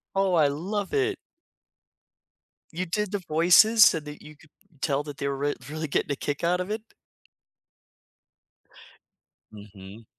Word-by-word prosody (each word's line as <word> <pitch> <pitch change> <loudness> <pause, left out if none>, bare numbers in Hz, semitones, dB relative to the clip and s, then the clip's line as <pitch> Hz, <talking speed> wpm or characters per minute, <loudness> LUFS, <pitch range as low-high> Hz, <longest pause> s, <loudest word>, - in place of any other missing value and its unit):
Oh, 195 -1 +1
I 155 -4 +4
love 190 +8 -4
it. 410 -1 +1 1.6
You 180 +3 -3
did 205 +3 -2
the 205 - -2
voices 180 +7 +5
so 165 - +5
that 150 -1 -11
you 155 0 -13
could 160 - -21 0.3
tell 140 -1 0
that 145 -1 -9
they 140 - -3
were 140 -1 -2
re 145 +1 -1
really 155 +1 -4
getting 145 - -1
a - - 0
kick 145 +2 -4
out 180 +2 +1
of 185 +3 -5
it? 215 +1 -3 2.7
Mhm. 105 0 -13
160 Hz, 145 wpm, -26 LUFS, 145-190 Hz, 2.7 s, voices